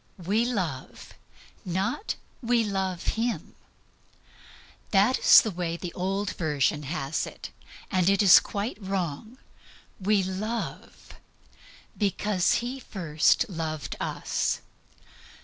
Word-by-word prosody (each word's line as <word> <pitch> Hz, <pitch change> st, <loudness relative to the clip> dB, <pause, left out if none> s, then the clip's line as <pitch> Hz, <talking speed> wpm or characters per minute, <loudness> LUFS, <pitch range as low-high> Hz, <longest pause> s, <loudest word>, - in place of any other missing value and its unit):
"We 215 Hz, +6 st, +2 dB
love," 185 Hz, -, -4 dB, 0.5 s
not 190 Hz, -, -2 dB, 0.3 s
"We 240 Hz, -1 st, +2 dB
love 190 Hz, -4 st, -2 dB
Him." 235 Hz, -1 st, -2 dB, 1.4 s
That 210 Hz, +6 st, +3 dB
is -, -, +9 dB
the 220 Hz, -, -2 dB
way 170 Hz, -2 st, -3 dB
the 175 Hz, -1 st, -6 dB
old 195 Hz, +2 st, -2 dB
version 150 Hz, -2 st, +1 dB
has 145 Hz, -2 st, -2 dB
it, -, -, -9 dB, 0.4 s
and 185 Hz, -1 st, +3 dB
it 200 Hz, +1 st, +3 dB
is 190 Hz, -, +9 dB
quite 205 Hz, +2 st, -4 dB
wrong. 190 Hz, -, -3 dB, 0.6 s
"We 200 Hz, 0 st, +2 dB
love 210 Hz, +5 st, -5 dB, 0.8 s
because 200 Hz, -2 st, +1 dB
He 260 Hz, +2 st, -4 dB
first 175 Hz, -, +1 dB
loved 160 Hz, -5 st, -4 dB
us." -, -, -1 dB
195 Hz, 105 wpm, -27 LUFS, 170-215 Hz, 1.4 s, is